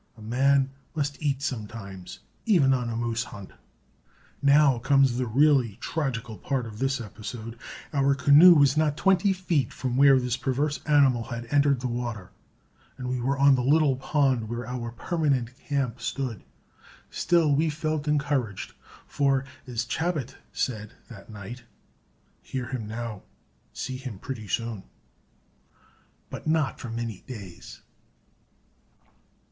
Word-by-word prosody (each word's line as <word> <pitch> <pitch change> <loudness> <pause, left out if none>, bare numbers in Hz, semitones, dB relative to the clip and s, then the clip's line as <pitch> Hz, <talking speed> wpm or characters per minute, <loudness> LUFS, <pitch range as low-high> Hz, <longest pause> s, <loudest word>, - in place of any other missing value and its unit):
A - - -14
man 135 +4 +2 0.2
must 145 -2 -2
eat 140 -2 -1
sometimes, 105 -7 -6 0.3
even 155 -11 +5
on 125 -2 -1
a 115 - -3
moose 115 0 -1
hunt. 100 -4 -10 0.9
Now 140 -2 +5
comes 135 -1 +3
the 125 - 0
really 130 -3 +3
tragical 120 -8 -3
part 135 -3 -2
of 110 -1 -9
this 135 0 0
episode; 115 +1 -7 0.4
our 140 -1 +3
canoe 145 +6 +8
was 140 -2 +5
not 155 -1 +1
twenty 190 +5 +3
feet 175 -9 0
from 125 -1 -3
where 135 -1 +7
this 125 0 -1
perverse 145 +3 -1
animal 135 -6 +4
had 120 0 -6
entered 140 -3 +3
the 130 - -1
water, 120 -6 -4 0.7
and 125 -1 -5
we 125 -1 -2
were 135 +3 0
on 140 0 +6
the 130 - +2
little 145 +1 +3
pond 130 -4 +1
where 120 0 -4
our 120 -1 -5
permanent 130 -2 -1
camp 130 -4 -1
stood. 120 -3 -3 0.7
Still 165 -4 +2
we 155 +3 +2
felt 155 0 -2
encouraged, 140 -8 -1 0.3
for, 135 -2 +1 0.2
as 120 -2 -2
Chabot 150 -1 -2 0.2
said 110 -4 -3 0.2
that 110 -3 -12
night, 110 +3 -8 0.8
"Hear 125 -3 -5
him 120 -5 -4
now, 110 -2 -5 0.5
see 130 - -5
him 130 -6 -7
pretty 110 -1 -7
soon." 115 0 -2 1.5
But - - -7
not 155 -3 +1
for 120 - -7
many 115 -3 -5
days. 100 -9 -10
130 Hz, 140 wpm, -26 LUFS, 115-145 Hz, 1.5 s, canoe